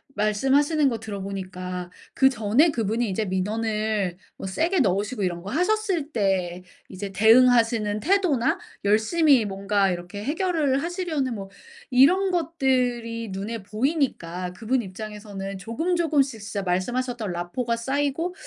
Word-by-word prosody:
말씀하시는 270 +9 +2
거 230 - -2
들어 205 -3 -6
보니까 185 -2 -5 0.2
그전에 265 +4 +4
그분이 225 -1 -1
이제 215 +3 -1
민원을 210 0 -1 0.2
어 - - -6
세게 330 - 0
넣으시고 205 0 0
이런 175 -2 -2
거 200 - -6
하셨을 360 -2 0
때 185 -4 0 0.2
이제 195 +1 -6
대응하시는 225 0 +4
태도나 320 - +2 0.3
열심히 240 +6 +4
뭔가 195 0 +1
이렇게 180 +3 -6
해결을 300 - 0
하시려는 330 -7 -2
뭐 195 -2 -7 0.4
이런 360 +10 +5
것들이 250 - 0
눈에 210 +4 -4
보이니까 205 - -2
그분 235 +6 0
입장에서는 200 -1 -7
조금조금씩 285 - 0
진짜 205 -1 -4
말씀하셨던 225 +3 -1
라포가 200 +8 -2
쌓이고 285 +8 -1
225 Hz, 320 characters per minute, -24 LUFS, 195-275 Hz, 0.4 s, 이런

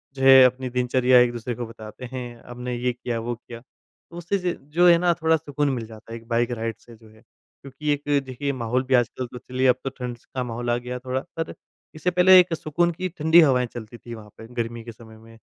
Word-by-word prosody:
जो 135 - -4
है 135 -1 +9
अपनी 130 +1 0
दिनचर्या 125 0 +3
एक-दूसरे 120 -1 0
को 120 - -5
बताते 110 +1 -10
हैं, 120 -2 -7
हमने 125 0 -5
ये 125 +1 0
किया 120 -1 -4
वो 120 +1 -3
किया। 120 0 -11
तो 170 +5 -19
उससे 175 +4 -1
ज 180 -1 -2 0.2
जो 175 +1 +5
है 170 -1 +7
ना 175 0 +2
थोड़ा 160 0 +4
सुकून 145 -1 -2
मिल 115 -3 -4
जाता 110 0 -13
है 115 - -5
एक 115 - -16
बाइक 120 +1 0
राइड 115 0 -3
से 120 - -16
जो 110 0 -19
है। 110 0 -20
क्योंकि 135 +3 -10
एक, 145 - -5 0.2
देखिए 135 +2 -3
माहौल 125 0 -1
भी 130 0 -2
आजकल 125 +1 0
तो 125 0 -10
चलिए 130 +2 -1
अब 125 - +5
तो 135 - -2
ठंड 125 -2 -6
स - - -30
का 125 - -1
माहौल 120 0 -4
आ 120 - +3
गया 125 +1 -6
थोड़ा, 130 +1 -2
पर 165 0 -6 0.4
इससे 165 +3 -1
पहले 185 +1 +7
एक 180 -1 +2
सुकून 170 +2 0
की 185 +2 -4
ठंडी 160 0 +4
हवाएँ 130 -4 +3
चलतीं 120 0 -8
थीं 120 - -7
वहाँ 105 -2 -12
पे 110 - -11
गर्मी 115 0 -6
के 115 - -8
समय 110 -1 -15
में। 115 0 -16
125 Hz, 245 wpm, -24 LUFS, 120-145 Hz, 0.4 s, है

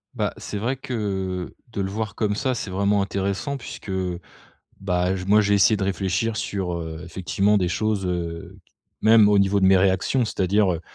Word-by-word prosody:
Bah, - - -1
c'est 105 - -6
vrai 120 +6 -1
que, 95 -8 -3 0.2
de 100 - -3
le 95 - -2
voir 110 +1 -4
comme 105 -2 0
ça, 130 +3 -1
c'est 105 -4 -5
vraiment 100 +2 +2
intéressant 100 +7 -2
puisque, 120 - -9
heu, 90 -2 -2 0.6
bah, 90 -1 0
j 90 - -5
moi 105 +2 +5
j'ai 100 0 +1
essayé 100 +2 +4
de 100 - -2
réfléchir 95 +3 -1
sur, 95 -4 -3
heu, 80 -1 -5
effectivement 95 +4 +1
des 90 -2 0
choses, 105 +1 -1
heu, 85 -2 -4 0.4
même 110 -1 +6
au 105 -1 +4
niveau 100 +1 +3
de 95 - +4
mes 95 0 +6
réactions. 95 +7 +2
C'est-à-dire, 100 -2 +1
heu, 80 - -5
100 Hz, 190 wpm, -23 LUFS, 90-105 Hz, 0.6 s, même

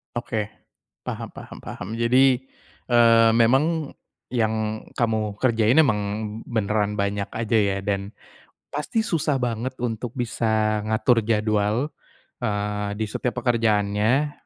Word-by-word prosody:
Oke. 110 -3 -2 0.6
Paham - - -4
paham - - -10
paham. 90 - -7
Jadi, 125 +2 +4 0.5
eee, 115 -1 +6
memang 140 +6 +2 0.4
yang 110 -2 -1 0.2
kamu 110 -3 0
kerjain 115 +1 +2
emang 115 -10 +4 0.5
beneran 105 -2 0
banyak 100 0 -1
aja 115 0 0
ya 100 -1 +1
dan 100 0 -2 0.6
pasti 150 +10 -1
susah 150 -8 0
banget 120 +2 -2
untuk 120 -1 -3
bisa 110 -3 0
ngatur 110 +1 +2
jadwal, 110 +4 +1 0.5
eee, 105 -2 -2
di 110 - -1
setiap 125 -1 -3
pekerjaannya 115 +3 +2
110 Hz, 110 wpm, -24 LUFS, 105-125 Hz, 0.6 s, eee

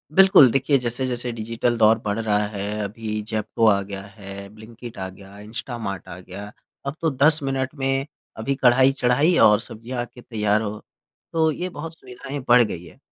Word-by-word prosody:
बिल्कुल। 190 -9 +8
देखिए, 135 +2 +2
जैसे-जैसे 125 0 -2
डिजिटल 115 +2 -1
दौर 110 0 +5
बढ़ 105 +2 -1
रहा 105 -2 +1
है, 105 +1 -4
अभी 110 +1 -4
ज़ेप्टो 110 +1 0
आ 100 -2 +4
गया 100 0 -6
है, 100 -1 -10
ब्लिंकिट 115 +1 -11
आ 95 0 -4
गया, 100 +1 -14
इंस्टामार्ट 110 -2 -6
आ 85 - -8
गया, 100 +3 -9 0.3
अब 140 +2 -3
तो 165 - +2
10 150 +4 +4
मिनट 135 0 -1
में 135 -1 0 0.3
अभी 135 +5 -1
कढ़ाई 130 +1 +5
चढ़ाई 140 +6 +2
और 105 0 +4
सब्ज़ियाँ 120 +3 -7
आके 120 0 -9
तैयार 105 -2 0
हो। 105 0 -4 0.5
तो 160 -1 +3
ये 180 +4 -4
बहुत 160 0 -7
सुविधाएँ 130 +3 -7
बढ़ 120 0 +7
गई 90 -6 -5
हैं। 80 - -15
115 Hz, 180 wpm, -23 LUFS, 105-135 Hz, 0.5 s, बिल्कुल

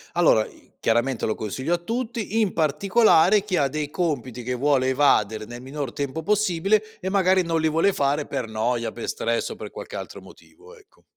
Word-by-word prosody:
Allora 160 -11 +4
i - - -18
chiaramente 120 +2 +1
lo 110 - 0
consiglio 130 - -3
a - - +2
tutti, 225 +1 -3
in 205 -4 0
particolare 190 +5 +4
chi 205 -3 -2
ha 140 - +3
dei 150 +1 -3
compiti 140 - -3
che 125 +1 -2
vuole 130 0 +2
evadere 110 -6 +2
nel 120 +1 -9
minor 135 0 -5
tempo 145 +3 -3
possibile 210 +2 +1
e 190 -1 -3
magari 190 -1 +3
non 165 -1 0
li 160 - +2
vuole 165 +5 +2
fare 145 +1 0
per 130 -4 -3
noia, 115 +2 -1
per 120 - -7
stress 115 0 -1
o - - -6
per - - -8
qualche - - -9
altro - - -7
motivo, 465 +3 -17
ecco. 410 -3 -25
150 Hz, 195 wpm, -24 LUFS, 125-190 Hz, -, Allora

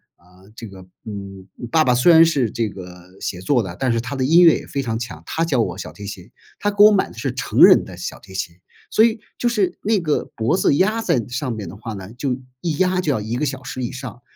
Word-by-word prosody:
啊， 90 +2 -22
这 115 - -8
个， 95 -2 -13 0.2
嗯， 100 -3 -8 0.2
爸 160 -1 +4
爸 125 - +3
虽 125 +8 +5
然 165 0 +8
是 140 -9 +1
这 115 -2 -1
个 90 -1 -12
写 90 - -5
作 120 +4 +1
的， 90 -3 -7
但 130 -2 0
是 115 - +1
他 120 +4 -5
的 130 - -1
音 165 +6 +6
乐 165 - +7
也 - - -9
非 140 - -3
常 115 -3 -3
强， 80 -9 -7
他 165 - -2
教 145 -7 0
我 90 -3 -3
小 - - -7
提 100 - -10
琴， 95 -3 -9 0.3
他 205 - 0
给 205 +1 +5
我 215 - +9
买 200 -2 +2
的 - - -15
是 - - -3
成 - - -3
人 - - +8
的 - - -11
小 - - -6
提 95 - -15
琴， 85 -3 -4 0.3
所 220 - +4
以 230 0 +2 0.2
就 240 - +1
是 205 -6 0
那 215 -1 +2
个 155 -3 0
脖 115 +9 +1
子 165 - +2
压 215 +8 +1
在 135 - +1
上 125 +1 -3
面 105 -5 -5
的 90 - -9
话 110 +2 -7
呢， 95 +1 -9
就 125 0 -2 0.2
一 160 -4 -2
压 185 0 +2
就 155 - 0
要 120 - 0
1 110 +3 -4
个 150 +5 -1
小 135 -1 -4
时 130 0 -5
以 120 - -3
上， 125 -2 -8
125 Hz, 280 characters per minute, -20 LUFS, 100-165 Hz, 0.3 s, 我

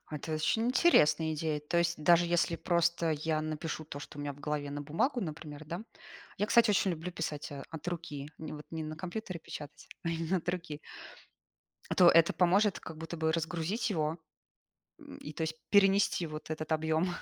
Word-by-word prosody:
А 150 - -5
это 160 +2 -5
очень 225 +9 +1
интересная 160 - +4
идея. 150 -1 -1
То 170 +3 0
есть 170 -2 0
даже 170 +2 +6
если 170 -1 +2
просто 170 -1 +1
я 155 +1 0
напишу 155 0 -4
то, 145 -1 -7
что 145 - -10
у - - -3
меня 145 0 -3
в 145 - -15
голове 150 -1 -2
на 145 0 -4
бумагу, 205 - 0
например, 155 -3 -6
да 170 +6 -5 0.6
Я, 210 - +1
кстати, 235 -1 +5
очень 200 -2 +3
люблю 170 +2 -4
писать, 150 -3 -4
а, 140 -1 -6
от 160 +1 -8
руки, 155 -4 -5
н 155 -1 -6
вот 150 - -10
не 160 -1 -4
на 155 0 -6
компьютере 185 0 -5
печатать, 150 -2 -9 0.2
а - - 0
именно 165 +3 0
от 175 - -10
руки. 165 -4 -3 1.1
А - - -1
то 180 - +7
это 165 -1 +6
поможет 195 +3 +3
как 160 -1 -9
будто 165 +1 -6
бы 160 0 +1
разгрузить 170 +7 -1
его? 160 -2 0 0.8
М, - - -11
и 150 - -8
то 160 - -5
есть 160 0 -2
перенести 195 -3 +4
вот 155 0 -8
этот 155 0 -4
объём 160 +2 +2
160 Hz, 200 wpm, -32 LUFS, 155-175 Hz, 1.1 s, то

